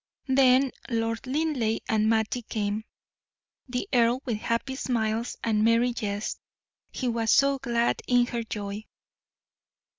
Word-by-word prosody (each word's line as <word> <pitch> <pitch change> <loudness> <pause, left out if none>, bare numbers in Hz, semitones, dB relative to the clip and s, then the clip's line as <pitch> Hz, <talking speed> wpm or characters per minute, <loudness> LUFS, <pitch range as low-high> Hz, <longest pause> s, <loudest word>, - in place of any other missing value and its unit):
Then 260 0 +5 0.2
Lord 230 +1 -2
Linleigh 260 -6 0
and 215 0 +2
Mattie 225 +2 +1
came. 215 -1 -3 0.8
The 245 0 -2
earl 240 +1 +3
with 235 -5 -1
happy 230 +4 -2
smiles 230 -3 -1
and 215 -2 +2
merry 230 +2 +3
jests; 205 -2 -3 0.5
he 255 - -3
was 230 -1 0
so 275 0 +4
glad 240 -2 0
in 245 -1 +4
her 240 -1 -3
joy. 210 -1 -5
235 Hz, 125 wpm, -27 LUFS, 220-255 Hz, 0.8 s, Then